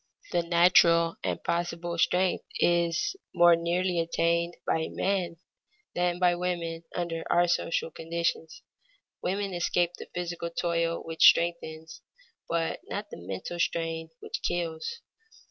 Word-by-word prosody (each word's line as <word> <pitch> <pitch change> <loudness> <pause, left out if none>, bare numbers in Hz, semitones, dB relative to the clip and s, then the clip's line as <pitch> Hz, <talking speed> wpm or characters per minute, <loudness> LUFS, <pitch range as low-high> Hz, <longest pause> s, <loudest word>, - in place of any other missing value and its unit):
The 175 - +2
natural 170 -1 +4
and - - -2
possible 170 0 -2
strength 180 +2 +2
is 170 - +2 0.2
more 175 -1 +7
nearly 175 +1 0
attained 170 +1 0
by 160 0 0
men 185 -4 -1 0.6
than 175 0 0
by 180 -1 +4
women 170 -2 -3
under 170 -2 -2
our 175 0 +4
social 170 -1 0
conditions. 165 0 -3 0.6
Women 195 +1 -2
escape 175 0 +1
the - - -8
physical 175 -1 -4
toil 170 0 -1
which 165 0 -1
strengthens, 160 -2 +1 0.5
but 165 -1 -1
not - - -5
the - - -7
mental 95 - -6
strain 165 -1 -1
which - - -5
kills. 175 - -3
170 Hz, 125 wpm, -28 LUFS, 165-175 Hz, 0.6 s, more